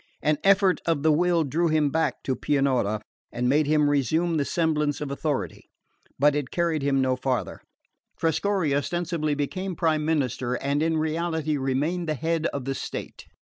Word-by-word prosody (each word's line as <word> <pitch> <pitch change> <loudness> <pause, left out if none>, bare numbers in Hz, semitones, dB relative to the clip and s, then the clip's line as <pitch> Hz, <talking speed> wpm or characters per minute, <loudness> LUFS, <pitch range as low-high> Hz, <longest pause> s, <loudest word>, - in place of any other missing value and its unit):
An 150 -1 +2
effort 195 -1 +4
of 160 -4 +1
the 160 - +5
will 170 +1 +2
drew 160 +4 0
him 155 -3 +2
back 160 +2 -1
to 130 - -1
Pianura, 130 -8 0 0.3
and 125 +1 -1
made 145 +3 +3
him 150 -1 +3
resume 155 +4 +1
the 145 - 0
semblance 150 -3 0
of 145 -2 -4
authority; 140 - -3 0.5
but 145 +1 +4
it 145 -3 -2
carried 170 -3 0
him 135 -1 +2
no 130 -1 +1
farther. 130 0 -2 0.6
Trescorre 165 -1 0
ostensibly 155 +1 -1
became 185 +6 -3
prime 155 -2 +1
minister, 130 -5 0
and 140 +3 -1
in 160 0 +1
reality 160 -1 -1
remained 145 +6 -1
the 155 - 0
head 165 +2 0
of 140 -3 -5
the 135 - -1
state. - - -7
150 Hz, 170 wpm, -25 LUFS, 140-165 Hz, 0.6 s, the